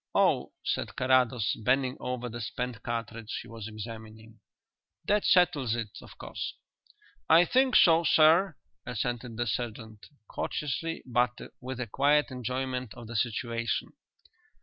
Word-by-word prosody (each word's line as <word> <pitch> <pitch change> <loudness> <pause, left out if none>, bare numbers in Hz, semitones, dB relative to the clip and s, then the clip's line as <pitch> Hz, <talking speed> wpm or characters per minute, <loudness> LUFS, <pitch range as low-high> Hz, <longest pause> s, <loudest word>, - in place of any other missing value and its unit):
"Oh," - - +3
said - - -2
Carrados, 130 -3 +2
bending 130 +3 +1
over 125 -1 -3
the 120 0 -6
spent 120 +1 -4
cartridge 115 -1 -4
he - - -14
was 115 -2 -8
examining, 110 0 -9 0.7
"that 210 0 +2
settles 155 -10 +3
it, 110 -3 -5
of - - -14
course." - - -5 0.7
"I 165 +2 +7
think 260 +5 +3
so, 165 -1 +6
sir," 160 +2 +5 0.3
assented 120 -1 -3
the 120 - 0
sergeant, 110 -1 -4 0.2
courteously 165 +3 -3
but 120 0 +1 0.2
with 130 0 -6
a 125 - -1
quiet 140 +4 +2
enjoyment 125 -1 -3
of 120 -1 -10
the 115 +1 -8
situation. 115 +1 -1
125 Hz, 130 wpm, -29 LUFS, 115-135 Hz, 0.7 s, I